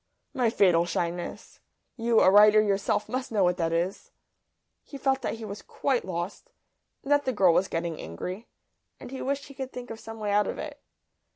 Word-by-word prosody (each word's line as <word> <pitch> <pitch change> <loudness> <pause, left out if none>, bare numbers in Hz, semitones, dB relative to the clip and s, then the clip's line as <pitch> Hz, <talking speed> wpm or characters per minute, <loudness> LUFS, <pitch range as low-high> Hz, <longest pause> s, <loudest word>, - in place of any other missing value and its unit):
"My 250 -5 +2
fatal 175 -6 +3
shyness! 175 +1 -4 0.4
You, 230 -2 +3
a 185 - +6
writer 210 +1 +7
yourself, 205 0 +1
must 255 0 -4
know 205 -3 +2
what 180 0 +2
that 165 -2 0
is!" 175 +4 -2 0.7
He 280 - -9
felt 270 0 +1
that - - -2
he 225 -1 -8
was 200 0 -7
quite 265 -4 -1
lost, 175 +1 -5 0.5
and 275 - -5
that 290 0 +4
the 260 - +1
girl 190 -7 +4
was 190 +3 +2
getting 165 -1 -3
angry, 180 - -6 0.5
and - - -10
he 265 - -6
wished 280 +1 -2
he 275 - -12
could 265 0 -6
think 250 -1 -8
of 225 - -7
some 225 0 -9
way 210 -2 -2
out 205 0 +3
of - - -4
it. 290 -2 -7
210 Hz, 200 wpm, -27 LUFS, 180-255 Hz, 0.7 s, writer